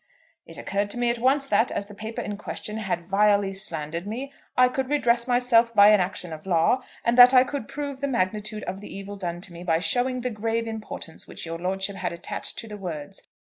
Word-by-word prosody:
"It - - -10
occurred 200 +1 -2
to 225 - -5
me 240 -1 +2
at 235 - -4
once 270 +3 +3
that, 245 -3 +2
as 200 - -2
the 205 - -12
paper 220 +2 -5
in 205 - -4
question 210 +1 -5
had 190 -5 -3
vilely 200 +1 +3
slandered 170 -1 -2
me, 260 +6 -5 0.2
I 250 0 +7
could 260 +1 -2
redress 240 -4 +2
myself 240 -2 +4
by 205 0 +8
an 210 -1 +6
action 180 -2 -2
of 155 +4 -10
law, 180 +8 +3 0.2
and 235 - +3
that 250 +1 +10
I 255 - +8
could 265 -3 -5
prove 280 -1 -5
the 280 - 0
magnitude 215 -2 -2
of 190 +2 -5
the - - -10
evil 200 +1 -7
done 175 -3 -5
me 170 +1 -9
by 165 -2 +2
showing 250 +7 0
the 250 0 -2
grave 225 +1 -1
importance 220 -7 -7
which - - -8
your 165 0 -5
lordship 190 +2 -2
had 180 -2 -3
attached 170 - -6
to 225 - -6
the 210 -1 -7
words. 160 -7 -7
210 Hz, 225 wpm, -25 LUFS, 185-245 Hz, 0.2 s, that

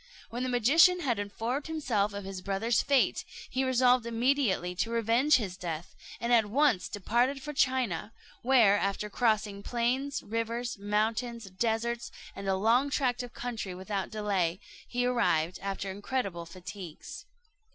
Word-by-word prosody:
When 240 +2 -4
the 255 - -1
magician 320 +10 +5
had 240 -9 0
informed 225 +7 -3
himself 245 -11 0
of 200 0 -6
his 190 -1 -6
brother's 200 +4 +1
fate, 275 -2 +2 0.3
he 260 - 0
resolved 250 -2 +3
immediately 230 -6 +1
to 225 - 0
revenge 235 +5 +3
his 200 -7 -1
death, 170 -2 -6 0.2
and 235 +1 0
at 225 -3 +5
once 235 -6 +2
departed 240 +7 0
for 300 - -5
China; 255 - 0 0.3
where, 230 -6 +5
after 200 +1 -2
crossing 215 -3 +1
plains, 250 +6 -1
rivers, 230 +2 -3
mountains, 220 +3 -1
deserts, 230 +4 -1 0.2
and 195 - -6
a 190 - +2
long 230 +8 +3
tract 255 -3 0
of 245 -1 -9
country 225 -6 -4
without 190 +1 -3
delay, 195 -5 -1 0.3
he 245 0 -1
arrived 185 -9 +1
after 195 0 -3
incredible 200 -4 -3
fatigues. 180 -1 -9
230 Hz, 145 wpm, -30 LUFS, 200-250 Hz, 0.3 s, magician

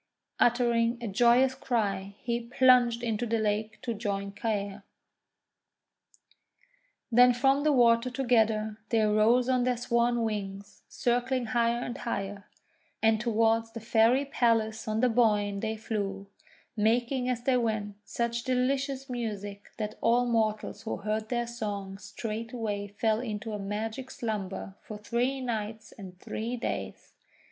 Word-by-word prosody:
Uttering 235 -1 +3
a 235 - -4
joyous 240 +5 +4
cry 200 -6 -2
he 235 -1 0
plunged 245 -1 +4
into 230 0 -1
the 230 +1 +1
lake 215 0 -1
to 240 -2 -2
join 200 -2 -3
Caer. 205 -1 -3 2.3
Then 245 +1 +6
from 270 +3 +3
the 305 - +4
water 235 -2 +4
together 220 -4 +1
they 225 -2 +3
rose 215 +4 +3
on 255 -1 +2
their 250 -1 +1
swan 235 0 +1
wings, 200 -2 -5
circling 245 +1 0
higher 235 0 +2
and 240 - -5
higher, 200 -3 -4 0.6
and 220 -1 +4
toward 225 -1 +2
the - - -4
Fairy 230 +4 +3
Palace 225 -5 +1
on 215 +1 0
the 255 - +4
Boyne 210 -4 +2
they 220 +1 -2
flew, 200 -3 -3 0.5
making 240 +4 +1
as 245 -1 -2
they 255 0 +3
went 215 -3 -1
such 235 0 -2
delicious 265 +2 0
music 205 -5 -5
that 215 -1 -4
all 240 +2 +3
mortals 215 -3 0
who 225 - -4
heard 215 +1 -3
their 240 -1 0
song 205 -4 -5
straightway 220 -2 -4
fell 215 +2 0
into 220 -2 -4
a 210 - -3
magic 220 +6 -4
slumber 210 -7 -4
for 215 - -8
three 245 +5 -1
nights 220 -3 -4
and 185 -3 -11
three 230 +5 -4
days. 235 - -5
230 Hz, 135 wpm, -29 LUFS, 210-245 Hz, 2.3 s, Then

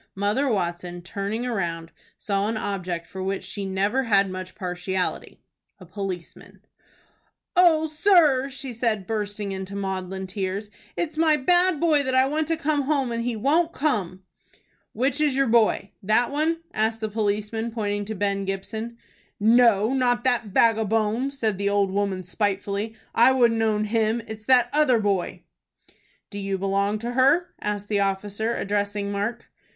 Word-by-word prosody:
Mother 210 +8 0
Watson, 175 -3 -3
turning 200 +6 -3
round, 170 -7 -3 0.3
saw 200 0 -1
an 220 0 -2
object 180 -5 -3
for 190 +3 -8
which 195 +1 -2
she 200 -1 -5
never 200 +7 0
had 200 -6 +2
much 185 0 -7
partiality, 185 -1 -3 0.3
a - - -13
policeman. 190 -5 -7 0.9
"O 335 -3 +5
sir," 310 -5 +3
said 245 -5 -2
she, - - -12
bursting 205 -1 -3
into 190 +1 -6
maudlin 190 -1 -4
tears, 195 +2 -4 0.3
"it's 315 -2 -3
my 315 -2 +4
bad 350 +3 +3
boy 315 -4 +3
that 260 -2 -1
I 260 0 +5
want 305 +2 -1
to 330 0 0
come 310 -2 0
home, 275 -3 0
and 230 0 -2
he 240 -1 -2
won't 320 +9 +1
come." 195 - -1 0.7
"Which 265 +5 0
is 290 -3 +2
your 275 0 +3
boy, 225 -4 +2
that 215 +6 +2
one?" 320 +3 0
asked 220 +1 0
the 220 - -1
policeman, 215 +1 -2
pointing 205 -3 -2
to 220 +1 -5
Ben 200 0 -1
Gibson. 220 +4 -5 0.4
"No, 225 0 +4
not 245 -2 +1
that 245 -3 +1
vagabone!" 225 +3 +2
said 220 -8 -2
the 200 0 +1
old 200 -1 +1
woman, 195 -2 -1
spitefully. 200 +3 -2 0.2
"I 235 +3 +6
wouldn't 235 -3 +3
own 215 -1 +1
him. 225 +1 0
It's 215 0 -8
that 250 -1 +5
other 295 -5 +4
boy." 200 -4 -1 0.9
"Do 205 - -6
you 195 -1 -2
belong 200 +2 0
to 235 +3 -4
her?" 275 +8 +3
asked 205 -1 -3
the 205 -1 0
officer, 200 +3 -1
addressing 205 0 -2
Mark. 210 +4 -3
215 Hz, 155 wpm, -24 LUFS, 195-255 Hz, 0.9 s, I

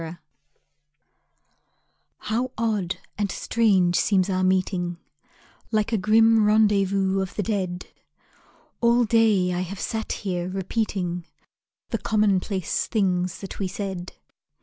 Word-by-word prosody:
MET 165 +1 -7 2.0
How 245 +4 -2
odd 210 -5 -1 0.2
and 200 -2 0
strange 190 -6 +2
seems 195 -1 +2
our 185 0 0
meeting 185 -2 0 0.7
Like 215 0 0
a 225 - +2
grim 225 +2 +4
rendezvous 200 -2 +3
of 190 -1 -5
the 205 - -1
dead. 185 -4 -2 1.0
All 235 +1 +4
day 215 -5 +3
I 175 - -1
have 185 +2 -6
sat 220 -1 -3
here 180 -3 -3
repeating 185 -3 -2 0.6
The 230 - -2
commonplace 200 -3 0
things 185 -5 0
that 195 - -8
we 195 - -1
said. 190 -2 -5
195 Hz, 115 wpm, -24 LUFS, 185-215 Hz, 2.0 s, grim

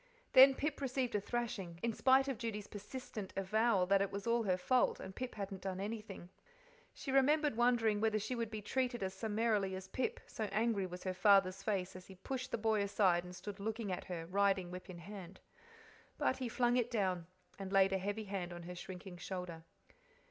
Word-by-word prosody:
Then 265 +1 +9
Pip 290 +1 -2
received 260 -2 -1
a 205 - +1
thrashing, 195 -7 -3
in 235 -1 +1
spite 265 +4 +4
of 265 -5 -2
Judy's 215 -4 -3
persistent 210 -1 -7
avowal 200 0 +2
that 195 +1 +4
it 200 - 0
was 200 0 -5
all 235 0 +2
her 185 -4 +1
fault, 250 +7 +2
and 190 - -8
Pip 255 -1 -5
hadn't 195 -2 -5
done 190 -1 -3
anything. 210 -3 -5 0.6
She 270 - -6
remembered 290 +1 +4
wondering 230 -3 +3
whether 220 -1 +2
she 215 +4 -2
would 230 -3 -2
be 215 -1 -6
treated 245 0 -1
as 190 0 -2
summarily 210 -2 0
as 190 0 -7
Pip, 255 +5 -2
so 220 - -4
angry 210 -1 0
was 180 0 -8
her 185 - -1
father's 195 -1 +4
face 190 -3 -1
as 185 0 -10
he 190 - -11
pushed 255 +7 -4
the - - -1
boy 220 -1 +2
aside 190 -3 +3
and 180 0 -9
stood 200 +1 -7
looking 220 0 -3
at 180 - -3
her, 170 -3 -5
riding 190 0 +1
whip 180 +1 -8
in 180 - -7
hand. 190 +1 -9 0.8
But 260 - +1
he 255 -2 -3
flung 245 +1 +2
it, 240 -1 +1
down 185 -7 0 0.3
and 195 -1 -5
laid 195 0 +5
a 190 - +1
heavy 205 +3 -2
hand 195 -3 -4
on 175 0 -7
her 180 +1 -6
shrinking 180 0 -8
shoulder. 180 -3 -5
205 Hz, 205 wpm, -36 LUFS, 190-235 Hz, 0.8 s, Then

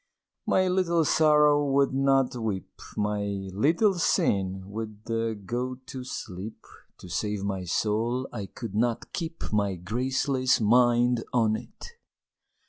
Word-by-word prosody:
My 185 0 +3
Little 175 -3 +2
Sorrow 150 -1 +4
would 140 -1 +2
not 135 -1 +2
weep, 110 -6 -4 0.2
My 105 -1 0 0.3
Little 165 - +3
Sin 95 - +1
would 105 +1 -7 0.4
go 125 +4 -2
to 130 0 -9
sleep 105 -4 -7 0.3
To - - -12
save 100 +3 -2
my 95 -2 -3
soul 115 +7 0
I 105 -5 -5
could 115 -2 -8
not 115 +2 -1
keep 165 - -5
My 100 -2 +1
graceless 130 - 0
mind 120 +1 +3
on 110 -3 +3
it! - - -9
120 Hz, 125 wpm, -27 LUFS, 105-135 Hz, 0.4 s, Sorrow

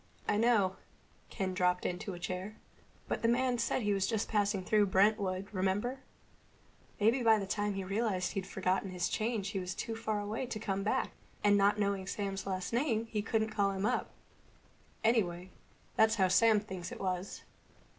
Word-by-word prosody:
"I - - +2
know." 210 -4 +3 0.5
Ken 190 -1 -2
dropped 180 0 +1
into 180 +2 -3
a - - -9
chair. 185 +4 -4 0.5
"But - - -2
the 230 - +2
man 245 +1 +2
said 235 +1 0
he 205 0 +2
was 195 -1 +1
just 220 0 -1
passing 205 -2 +1
through 210 +1 +3
Brentwood, 195 -1 +2
remember? 205 +7 -1 1.0
Maybe 225 +5 +3
by 225 -2 +5
the 200 - -2
time 205 +1 -1
he 195 - -3
realized 195 -1 -1
he'd 195 -3 -4
forgotten 190 0 -1
his 180 -1 -1
change 215 -3 -1
he 200 -2 -2
was 180 0 -4
too 225 - -4
far 220 -2 -2
away 215 +5 -3
to 235 -3 -4
come 195 -2 -2
back, 205 - 0 0.3
and 205 -1 +5
not 200 +1 +4
knowing 200 -2 -1
Sam's 195 -1 -3
last 185 +2 -3
name 230 -3 0 0.2
couldn't 220 -1 +1
call 200 -2 +1
him 195 +1 -2
up. - - 0 0.9
Anyway, 185 -6 +1 0.4
that's 220 0 +4
how 190 -4 +3
Sam 220 +3 +5
thinks 190 -4 -7
it - - -7
was. 185 0 -3
205 Hz, 175 wpm, -32 LUFS, 190-220 Hz, 1.0 s, by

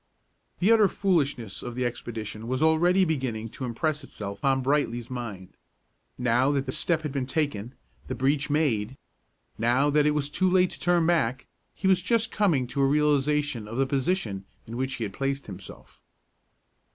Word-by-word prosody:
The 195 +5 +3
utter 220 -3 +6
foolishness 145 - 0
of 120 -1 -6
the 125 0 -1
expedition 110 -2 -5
was 130 +4 0
already 175 +4 +4
beginning 130 -8 -2
to 130 - -6
impress 150 +5 -2
itself 100 -6 -7
on 135 -1 +2
Brightly's 125 -4 0
mind. 110 -7 -6 0.7
Now 125 +2 +2
that 135 -1 0
the 130 - -3
step 160 +3 0
had 150 - -3
been 135 -2 -2
taken, 130 -6 -2 0.3
the - - -3
breach 140 +2 +1
made, 135 -6 0 0.6
now 125 +6 +3
that 150 0 +4
it 150 - +2
was 145 -2 0
too 185 +4 +2
late 185 0 +3
to - - -9
turn 175 -2 +2
back, 130 -7 +1 0.3
he 190 - -1
was 190 -1 +4
just 230 +4 +1
coming 170 -12 +2
to 140 +3 -2
a 135 - +4
realization 145 -4 +1
of 115 +3 -6
the 135 - +3
position 130 - -1 0.2
in 115 - -8
which 130 +1 -2
he 115 - -4
had 100 -3 -4
placed 135 +4 -2
himself. 95 -2 -11
135 Hz, 175 wpm, -27 LUFS, 120-155 Hz, 0.7 s, utter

